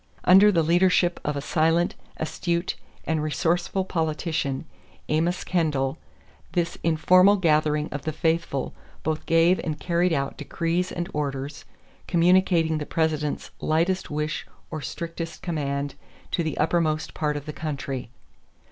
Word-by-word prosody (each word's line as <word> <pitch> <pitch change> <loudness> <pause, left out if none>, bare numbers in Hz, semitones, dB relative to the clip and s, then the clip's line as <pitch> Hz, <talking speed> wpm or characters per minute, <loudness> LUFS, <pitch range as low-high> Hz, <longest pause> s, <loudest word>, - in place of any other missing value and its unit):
Under 195 +3 +7
the 170 -4 +3
leadership 175 +1 +3
of 150 - -1
a - - -2
silent, 165 +3 +2 0.2
astute, 170 +2 -1 0.3
and 160 -1 0
resourceful 170 +5 0
politician, 160 -4 -1 0.4
Amos 165 +4 +1
Kendall, 150 -5 0 0.5
this 170 -1 0
informal 185 +4 +5
gathering 155 -4 +2
of 145 - -4
the 155 - -2
faithful 160 -3 -1 0.3
both 155 0 -1
gave 165 +2 +4
and 155 -3 -3
carried 175 +1 +1
out 140 -2 -1
decrees 170 +4 -1
and 175 0 -3
orders, 140 -1 -3 0.4
communicating 170 -2 +3
the 150 - -5
President's 155 -2 -1
lightest 170 +4 +1
wish 150 +1 -3 0.2
or 155 -2 -4
strictest 165 +4 -6
command 140 -4 -2 0.4
to - - +1
the 160 -3 -2
uttermost 155 -1 +1
part 150 -1 -1
of 145 - -7
the 150 - -5
country. 140 -5 -4
160 Hz, 130 wpm, -25 LUFS, 150-175 Hz, 0.5 s, Under